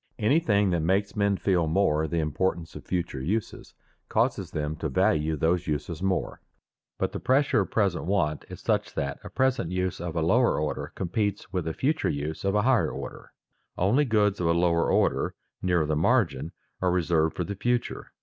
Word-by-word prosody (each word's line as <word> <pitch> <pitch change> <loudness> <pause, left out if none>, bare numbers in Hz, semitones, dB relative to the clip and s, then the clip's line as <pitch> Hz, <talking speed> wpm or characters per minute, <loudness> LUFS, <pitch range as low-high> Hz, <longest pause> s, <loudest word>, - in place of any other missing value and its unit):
Anything 105 - +2
that 85 - +1
makes 95 +5 0
men 100 -1 +2
feel 90 -5 +1
more 80 -3 +2
the 85 - -2
importance 80 +2 -1
of - - -8
future 85 -7 -3
uses 100 +10 -3 0.3
causes - - 0
them 75 0 -3
to 80 -1 -3
value 75 +3 +1
those 85 +4 +1
uses 75 +3 -3
more. 95 -1 -1 0.6
But - - -1
the - - -5
pressure 135 -2 +2
of 95 - -1
present 100 -7 0
want 85 -6 0
is - - -9
such - - -1
that 70 0 -2
a - - -8
present 130 -9 0
use 90 -1 -2
of 85 -1 -4
a 80 - +1
lower 120 +6 +3
order 75 0 -3
competes 100 +3 -2
with 90 -3 -1
a 80 - -1
future 150 +4 0
use 75 +2 -3
of 100 +1 +1
a 105 - +3
higher 130 -1 +3
order. - - -8 0.5
Only 115 +11 +3
goods 105 -4 +2
of 85 - 0
a 85 - +4
lower 85 -1 +2
order, - - +1 0.3
nearer 90 -4 +2
the 75 0 0
margin, 80 - +1 0.3
are 90 - +2
reserved 85 -3 +1
for 90 - -1
the 100 - -4
future. 120 +4 -2
90 Hz, 190 wpm, -27 LUFS, 80-105 Hz, 0.6 s, a